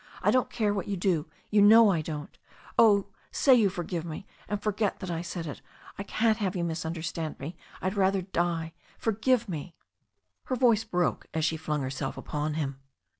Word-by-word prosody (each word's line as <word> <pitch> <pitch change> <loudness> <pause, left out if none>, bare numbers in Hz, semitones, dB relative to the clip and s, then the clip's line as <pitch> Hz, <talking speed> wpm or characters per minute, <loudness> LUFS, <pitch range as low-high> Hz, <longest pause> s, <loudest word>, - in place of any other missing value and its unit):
I 210 - +4
don't 255 +1 +2
care 215 -3 0
what 195 -4 -3
you 200 -1 -2
do— 175 -3 +1 0.2
you 210 -1 +5
know 220 +1 +8
I 170 -4 +1
don't 150 -1 -6 0.4
Oh, 205 -4 +5 0.2
say 270 - +4
you 225 -5 +5
forgive 175 -2 -4
me 165 +3 -6 0.2
and 205 0 -2
forget 210 0 0
that 185 -3 -5
I 165 -1 -2
said 170 -1 -5
it. 145 - -7 0.3
I - - -6
can't 220 +2 +1
have 195 -2 -1
you 175 - -1
misunderstand 165 -1 -3
me 155 +6 -6
— - - -19
^I'd 185 +1 0
rather 195 -1 +2
die. 170 -3 -1 0.2
Forgive 225 +2 +1
me 165 -1 -6 0.7
Her 260 - -1
voice 230 -3 +4
broke 180 -5 -1
as 160 -1 +1
she 160 - +1
flung 150 -2 -2
herself 135 +1 -4
upon 150 0 -3
him. 140 -4 -3
180 Hz, 190 wpm, -28 LUFS, 160-210 Hz, 0.7 s, know